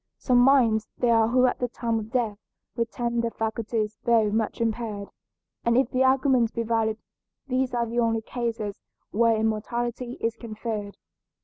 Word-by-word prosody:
Some 250 -2 +3
minds 240 -5 +4
there 240 -1 +3
are 225 -1 +4
who 255 +2 +4
at 250 - +1
the 245 - 0
time 230 -1 -2
of 215 0 -7
death 225 -5 -1 0.4
retain 235 0 -1
their 235 - 0
faculties 220 -1 -2
though 225 -3 +4
much 220 0 -1
impaired, 220 -3 -2 0.5
and 235 0 +3
if 260 -1 +2
the 255 +1 +2
argument 260 -3 +3
be 230 - 0
valid 220 -1 0 0.5
these 255 -1 -1
are 235 -1 +1
the 235 +1 -2
only 225 -1 +1
cases 230 -4 -4 0.3
where 230 +1 +3
immortality 235 +3 -2
is 230 0 -1
conferred. 215 -3 -5
230 Hz, 165 wpm, -26 LUFS, 220-240 Hz, 0.5 s, minds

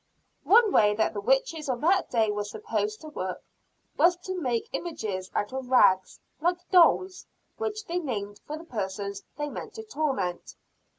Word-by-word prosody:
One 440 0 +6
way 210 - +4
that 220 +1 +1
the 205 - -4
witches 270 +6 +1
of 245 -2 -1
that 370 +4 +3
day 225 -3 +2
were 210 0 -2
supposed 425 - -3
to 310 - -9
work, 185 -11 -5 0.5
was 350 +1 +5
to 375 -1 -3
make 240 -5 -1
images 210 - -4
out 205 +4 -1
of 260 -1 -5
rags, 190 -7 +4 0.2
like 350 +3 -1
dolls, 370 +1 +4 0.3
which 435 -1 -3
they 350 -1 -1
named 205 - -4
for 305 - -4
the 320 - -10
persons 200 - -4 0.2
they 295 0 -2
meant - - -7
to 445 - -6
torment. 270 - -2
270 Hz, 170 wpm, -27 LUFS, -, 0.5 s, One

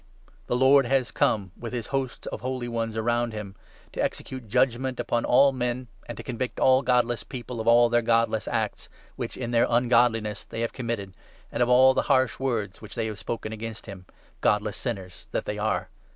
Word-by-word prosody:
the - - 0
Lord 130 +1 +5
has 130 -1 +1
come 100 -4 +1
with 120 +1 -7
his 120 -3 -3
hosts 135 -2 -2
of - - -5
holy 130 -1 -3
ones 115 -1 -3
around 120 +1 0
him, 105 -2 -7 0.4
to - - -1
execute 130 -3 -4
judgement 130 +3 +1
upon 120 - 0
all 135 +3 +5
15 130 - -8
men, 125 +1 -2 0.2
and - - -7
to - - -7
convict 125 0 -4
all 130 0 +5
godless 125 -2 +1
people 120 -2 -6
of 110 - -6
all 120 +1 +7
their 120 0 +2
godless 115 -2 +1
acts, - - -2 0.3
which - - -5
in 120 -2 -4
their 115 -1 +3
ungodliness 120 -3 +2
they 115 - -6
have 115 - -2
committed, 115 -6 -4 0.4
and - - -2
of 120 - +3
all 130 +1 +7
the - - +2
harsh 130 -3 +3
words 115 -7 -2
which 110 - -10
they 115 -2 -1
have 110 -2 -5
spoken 110 -1 -4
against 110 0 -7
him, 95 -3 -10 0.3
godless 105 0 +1
sinners 95 -9 -6
that - - -1
they 105 0 -3
are 100 -4 -1
120 Hz, 200 wpm, -26 LUFS, 110-125 Hz, 0.4 s, all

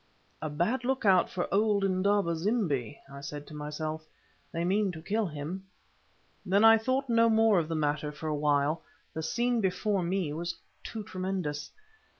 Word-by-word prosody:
"A 155 - -2
bad 175 - 0
look 260 -1 -1
out 185 -3 +5
for 180 - -2
old 205 0 +3
Indaba 195 -2 +2
zimbi," 160 - -1
I 140 0 -10
said 145 +1 -6
to 155 - -12
myself. 155 +1 -4 0.5
"They 170 +1 -2
mean 195 +2 +2
to 160 - -7
kill 215 +3 0
him." 165 +5 -6 0.8
Then 200 +2 +3
I 225 0 +8
thought 260 +4 0
no 230 -1 +4
more 220 -3 +5
of 160 - -2
the 165 - -2
matter 150 -1 0
for 150 +2 -9
a 155 - 0
while, 145 +1 +1 0.3
the 160 - -3
scene 240 +8 0
before 195 +1 0
me 175 -3 -1
was 170 +2 -3 0.3
too 220 -2 -5
tremendous. 185 -7 -3
180 Hz, 170 wpm, -30 LUFS, 155-210 Hz, 0.8 s, I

